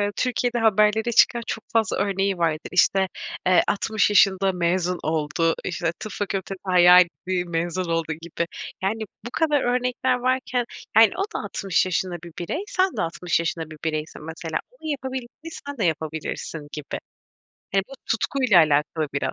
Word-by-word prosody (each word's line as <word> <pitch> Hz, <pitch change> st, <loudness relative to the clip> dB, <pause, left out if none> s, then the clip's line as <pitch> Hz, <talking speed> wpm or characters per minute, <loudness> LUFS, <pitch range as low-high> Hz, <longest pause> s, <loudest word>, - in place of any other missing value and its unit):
Türkiye'de 245 Hz, -1 st, 0 dB
haberlere 220 Hz, +1 st, +3 dB
çıkan 235 Hz, +1 st, +4 dB
çok 220 Hz, -, -4 dB
fazla 225 Hz, -3 st, +2 dB
örneği 195 Hz, -1 st, 0 dB
vardı. 165 Hz, -2 st, -1 dB
İşte, 190 Hz, +1 st, +3 dB, 0.4 s
eee, 185 Hz, -1 st, +6 dB
60 210 Hz, +1 st, +1 dB
yaşında 195 Hz, -1 st, +4 dB
mezun 180 Hz, 0 st, 0 dB
oldu, 160 Hz, +1 st, 0 dB
işte 170 Hz, -2 st, -1 dB
tıp 215 Hz, -, -6 dB
fakültesi 195 Hz, -1 st, -3 dB
hayaliydi, 180 Hz, 0 st, +5 dB
mezun 170 Hz, +2 st, -1 dB
oldu 165 Hz, -1 st, -1 dB
gibi. 170 Hz, 0 st, -3 dB, 0.4 s
Yani, 220 Hz, +3 st, -1 dB, 0.2 s
bu -, -, -4 dB
kadar 300 Hz, -4 st, +2 dB
örnekler 250 Hz, +1 st, +1 dB
varken, 255 Hz, -1 st, 0 dB, 0.3 s
yani, 225 Hz, 0 st, +8 dB
o -, -, -1 dB
da -, -, 0 dB
60 195 Hz, -3 st, 0 dB
yaşında 185 Hz, 0 st, -1 dB
bir 170 Hz, -, -9 dB
birey, 175 Hz, -, -3 dB
sen 375 Hz, -1 st, 0 dB
de -, -, +1 dB
60 170 Hz, +1 st, -1 dB
yaşında 165 Hz, -1 st, -3 dB
bir 155 Hz, -, -9 dB
bireysin 155 Hz, -1 st, -3 dB
mesela. 160 Hz, 0 st, -4 dB
Onun 320 Hz, -11 st, -8 dB
yapabildiğini 265 Hz, +3 st, -6 dB, 0.2 s
sen 285 Hz, -2 st, -6 dB
de 215 Hz, -, -1 dB
yapabilirsin 160 Hz, -1 st, -3 dB
gibi. 150 Hz, -2 st, -5 dB, 0.8 s
Yani, 195 Hz, -, +4 dB
bu -, -, -14 dB
tutkuyla 230 Hz, -3 st, +2 dB
alakalı 150 Hz, 0 st, +2 dB
biraz. 140 Hz, -, -1 dB
185 Hz, 155 wpm, -24 LUFS, 165-230 Hz, 0.8 s, yani